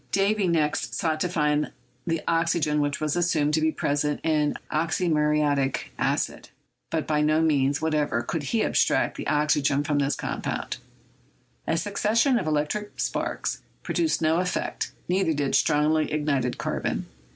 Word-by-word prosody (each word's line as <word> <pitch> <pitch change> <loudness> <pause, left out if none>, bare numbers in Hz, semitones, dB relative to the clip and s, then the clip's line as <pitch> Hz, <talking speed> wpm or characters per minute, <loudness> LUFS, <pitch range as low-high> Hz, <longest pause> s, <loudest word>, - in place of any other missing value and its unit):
Davy 200 0 +2
next 150 -8 0
sought 160 -2 0
to 180 - 0
find 150 -3 +1 0.4
the 165 -2 -1
oxygen 165 -3 +1
which 145 -1 -1
was 155 0 -1
assumed 160 -4 +1
to 155 - +2
be 160 0 +2
present 145 0 -1
in 155 -2 +1 0.2
"oxymuriatic 150 -4 +1
acid," - - -1 0.4
but 160 -2 -1
by 150 -1 +1
no 155 +1 +3
means 145 -2 +2
what 160 -1 +1
ever 145 -6 0
could 165 +6 -3
he 215 - 0
abstract - - +2
the - - -5
oxygen 150 -1 +2
from 145 0 0
this 140 0 +1
compound; - - -3 0.9
2. - - +2
succession 215 - +2
of 185 - -4
electric 155 +8 -2
sparks - - -2 0.2
produced 320 - 0
no 160 +2 +3
effect, 180 0 -2 0.2
neither 180 -3 +1
did 140 -1 -1
strongly 155 0 +2
ignited 140 -5 0
carbon. - - -2
155 Hz, 150 wpm, -26 LUFS, 150-170 Hz, 0.9 s, no